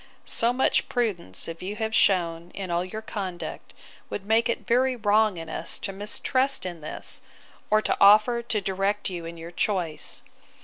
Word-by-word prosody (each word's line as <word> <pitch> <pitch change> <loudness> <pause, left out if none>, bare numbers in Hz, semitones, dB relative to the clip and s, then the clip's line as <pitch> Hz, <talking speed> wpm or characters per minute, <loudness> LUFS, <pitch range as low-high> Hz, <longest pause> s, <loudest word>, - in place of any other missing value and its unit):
So 230 +1 +2
much 255 +2 +2
prudence 200 - -1
as 165 0 -7
you 195 +3 -4
have 220 +1 -2
shewn 170 -5 +2
in 190 -3 -4
all 170 +1 +1
your 215 +4 -6
conduct, 190 -5 -5 0.4
would 195 - -5
make 225 +3 +3
it 235 - -2
very 255 +2 +3
wrong 215 -3 +3
in 165 0 -6
us 160 +1 -4
to 195 - -5
mistrust 255 +7 0
it - - -1
in 170 -2 -10
this, 150 - -4 0.5
or 215 0 +4
to - - +1
offer 215 +4 +7
to 225 -3 -1
direct 195 +1 0
you 170 -2 -5
in 170 0 -7
your 165 +1 -8
choice. 170 -5 -2
200 Hz, 180 wpm, -26 LUFS, 175-220 Hz, 0.5 s, offer